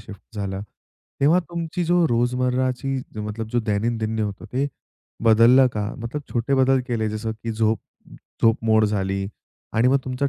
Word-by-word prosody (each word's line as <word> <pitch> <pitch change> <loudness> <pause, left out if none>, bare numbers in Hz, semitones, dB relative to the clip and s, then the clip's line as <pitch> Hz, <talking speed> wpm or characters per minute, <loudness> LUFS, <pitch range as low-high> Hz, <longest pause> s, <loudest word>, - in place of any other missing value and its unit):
Shift 105 0 -13
झाला, 95 -1 -3 0.6
तेव्हा 150 +6 +5
तुमची 170 +1 -4
जो 175 0 +3
रोजमर्राची 125 +2 0 0.2
जो 105 - -4
मतलब 110 +1 -5
जो 120 - +2
दैनंदिन 110 +1 -1
होतं 105 -2 -3
ते 135 +3 +1 0.6
बदललं 115 +4 +7
का? 105 0 -3
मतलब 120 +5 -5
छोटे 120 +3 +1
बदल 130 0 +4
केले 110 -3 0
जसं, 110 +1 -3
की 115 +1 -5
झोप 110 -1 +1 0.6
झोप 115 0 +5
मोड 110 -1 +4
झाली. 95 -2 -1 0.5
आणि 115 +3 +3
मग 135 +2 +4
तुमच्या 130 +2 -1
115 Hz, 160 wpm, -23 LUFS, 110-130 Hz, 0.6 s, बदललं